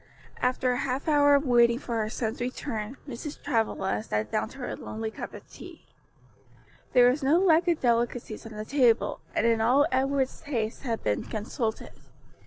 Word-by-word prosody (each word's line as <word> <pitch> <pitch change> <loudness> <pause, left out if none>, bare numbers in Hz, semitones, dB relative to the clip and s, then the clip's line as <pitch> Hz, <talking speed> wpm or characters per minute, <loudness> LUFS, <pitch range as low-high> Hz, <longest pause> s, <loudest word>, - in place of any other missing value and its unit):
After 250 0 +1
a 245 - 0
half 270 +3 -2
hour 290 -2 +5
of 280 +1 +1
waiting 235 -2 +4
for 235 -4 -3
her 215 - -2
son's 225 +1 -3
return, 245 -1 -4
Mrs. 275 +3 -7
Travilla 225 - -1
sat 105 0 -3
down - - -1
to - - -13
her 255 - -4
lonely 220 0 -5
cup - - -7
of - - -12
tea. - - -13 1.1
There 245 -1 +7
was 285 +4 -3
no 280 +5 +4
lack 350 -2 +4
of 340 -3 +1
delicacies 235 -2 -1
on 225 - -10
the 215 0 -6
table, 245 -3 +2 0.2
and - - +1
in 230 -1 +3
all 255 +6 +4
Edward's 265 0 0
taste 230 -6 -3
had 230 -4 -3
been 105 -1 -1
consulted. 220 +1 -4
245 Hz, 180 wpm, -27 LUFS, 225-275 Hz, 1.1 s, There